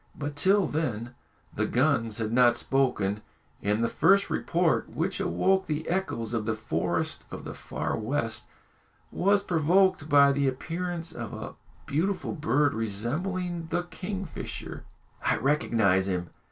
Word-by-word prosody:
But 145 0 -4
till 190 +6 +3
then 120 -6 -2 0.4
the - - 0
guns 120 -5 +1
had 110 -2 -2
not 120 0 +5
spoken, 110 -7 +1 0.4
and 105 +3 +1
the - - +3
first 200 +10 +3
report 170 -1 +1
which 180 +5 -2
awoke 190 0 +1
the 155 0 -2
echoes 145 - -2
of 115 -2 -1
the 110 - +1
forest 110 +1 -2
of - - -7
the - - -6
Far - - -3
West 115 -1 -2 0.6
was 200 +2 +2
provoked 180 -1 +2
by 140 -1 +7
the 140 0 +1
appearance 165 +5 -3
of 120 -7 -6
a - - -6 0.3
beautiful 185 +7 -1
bird, 150 -3 +2
resembling 165 - -2
the 175 - -1
kingfisher. 185 0 -6 0.4
"I - - +2
recognise 110 -8 +2
him!" 90 -3 -2
145 Hz, 140 wpm, -28 LUFS, 115-180 Hz, 0.6 s, by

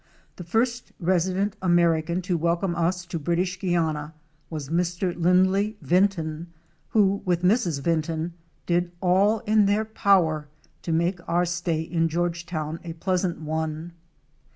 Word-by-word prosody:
The 180 - -7
first 235 +7 -1
resident 185 +3 +1
American 170 -1 +2
to 180 -1 0
welcome 170 +2 0
us 175 +1 0
to 170 -1 -4
British 175 +4 -1
Guiana 160 -4 -1 0.3
was 150 -4 -5
Mr. 175 +2 0
Lindley 190 +4 +2
Vinton 170 -3 +1 0.4
who, 200 -2 +3
with 175 -1 0
Mrs. 180 - +2
Vinton, 165 0 -1 0.3
did 175 0 0
all 195 +4 +3
in 215 -1 +3
their 210 +2 +2
power 180 -8 +2 0.3
to 170 - -4
make 170 +3 +1
our 175 +1 +2
stay 175 -2 -1
in 165 0 0
Georgetown 170 -1 -2
a 170 -2 -6
pleasant 180 0 -1
one. 160 +1 -3
175 Hz, 130 wpm, -25 LUFS, 165-185 Hz, 0.4 s, who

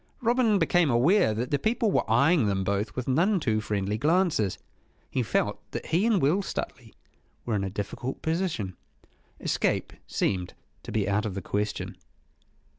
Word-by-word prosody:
Robin 235 -3 +3
became 170 -2 +3
aware 130 - +4
that 115 +4 -3
the 145 - +2
people 220 -1 +1
were - - 0
eyeing 140 +3 +4
them 95 -1 0
both 100 +2 -1
with 125 - -4
none 180 +9 +3
too 110 -7 0
friendly 105 0 -2
glances. 155 - +2 0.5
He 130 - 0
felt 110 - 0
that - - -4
he 180 +7 +2
and 220 -5 +3
Will 160 +8 +2
Stuteley 120 - -6 0.5
were 120 - -1
in 100 -2 0
a 95 - -2
difficult 100 +6 -5
position. 160 - -1 0.6
Escape - - 0
seemed 90 -3 -1 0.3
to - - -8
be 105 -3 0
out 105 +2 +1
of 95 - -5
the 100 - -3
question. 105 +1 -2
125 Hz, 165 wpm, -27 LUFS, -, 0.6 s, aware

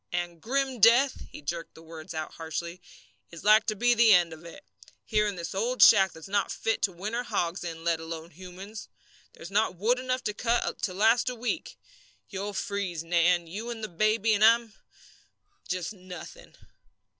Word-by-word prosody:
And 175 -1 -4
grim 265 +2 -1
death," 240 +5 +4
he - - -11
jerked 165 +3 -5
the 160 - -14
words 160 +1 -10
out 155 -1 -4
harshly, 170 +2 -6 0.5
"is 170 - -11
like 215 +1 +5
to 215 - 0
be 240 +4 +3
the 230 -2 +6
end 175 -2 +2
of 160 +1 -12
it, 170 -9 -12 0.4
here 210 -1 +1
in 205 - -3
this 170 -2 -6
old 235 +6 +2
shack 195 -3 +7
that's 160 +2 -12
not 200 +1 0
fit 225 - -1
to 195 - +1
winter 210 +7 -4
hogs 185 -7 -2
in, 165 -1 -6
let 165 -1 +1
alone 165 +1 -7
humans. 190 +5 -10 0.5
There's 170 - -11
not 210 -2 +1
wood 230 +8 +1
enough 255 0 -2
cut 235 0 -1
to 185 - -2
last 225 +5 +3
a 250 - -5
week. 245 +7 -4 0.5
You'll 200 +1 -5
freeze, 195 -5 -3
Nan, 175 +1 +2
you 210 +8 -6
and 230 -2 -6
the 215 - -4
baby, 215 +4 +2
and 210 0 +2
I'm 230 0 +4 0.9
just 180 +2 -3
nothing." 185 -3 -11
195 Hz, 180 wpm, -28 LUFS, 170-225 Hz, 0.9 s, shack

